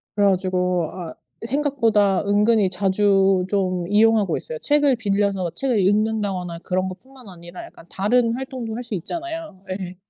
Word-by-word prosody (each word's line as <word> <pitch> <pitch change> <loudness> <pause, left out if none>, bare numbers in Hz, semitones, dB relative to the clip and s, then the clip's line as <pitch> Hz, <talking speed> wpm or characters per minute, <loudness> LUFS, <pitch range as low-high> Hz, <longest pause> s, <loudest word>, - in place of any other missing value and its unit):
그래 205 - +3
가지고 180 -3 0
아 175 -3 -7 0.3
생각보다 230 -8 +1
은근히 205 0 +3
자주 195 0 +2
좀 185 -3 -1
이용하고 215 -1 +3
있어요. - - -7
책을 290 - +3
빌려서 200 -4 0
책을 260 0 0
읽는다거나 195 -3 0
그런 185 +1 -1
것뿐만 255 +6 -12
아니라 175 0 -10
약간 - - -16
다른 230 +4 +1
활동도 255 -3 -5
할 245 - -5
수 230 -4 -5
있잖아요. 325 - -6
예. 185 -1 -5
205 Hz, 340 characters per minute, -22 LUFS, 185-235 Hz, 0.3 s, 그래